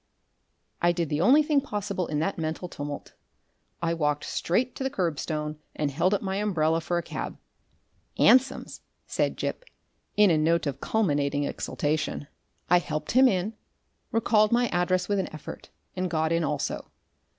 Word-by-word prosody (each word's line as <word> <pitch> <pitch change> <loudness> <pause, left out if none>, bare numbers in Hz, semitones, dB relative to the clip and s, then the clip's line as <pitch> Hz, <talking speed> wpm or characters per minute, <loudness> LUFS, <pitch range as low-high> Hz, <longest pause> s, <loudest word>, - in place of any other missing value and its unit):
I 175 - +4
did 170 -3 -1
the 150 +1 0
only 275 - +6
thing 295 -2 +2
possible 205 -7 -3
in 150 - -2
that 185 +2 -1
mental 160 +3 -3
tumult; 145 -3 -6 0.7
I 165 0 +1
walked 150 -3 0
straight 235 +8 0
to - - -4
the 265 - 0
kerbstone 155 - -2 0.2
and 150 -2 -1
held 175 +8 +2
up 200 - -3
my 190 0 -1
umbrella 165 -6 +1
for 175 +2 -1
a 170 - -1
cab. - - -5 0.8
"'Ansoms," 260 +1 +3 0.2
said - - -1
Gip, - - -3 0.5
in 210 -3 +6
a 155 - +3
note 165 +2 +2
of 140 -2 -3
culminating 145 -9 +1
exultation. 150 +1 -2 0.4
I 180 +1 +5
helped 155 -3 -4
him 260 +2 +6
in, 195 0 0 0.6
recalled 215 -2 +3
my 240 0 +3
address 180 +1 +1
with 205 -1 +1
an 190 - -2
effort, 155 - -9 0.3
and 185 0 -1
got 160 -1 0
in 165 0 +2
also. 150 0 -2
175 Hz, 160 wpm, -27 LUFS, 155-205 Hz, 0.8 s, only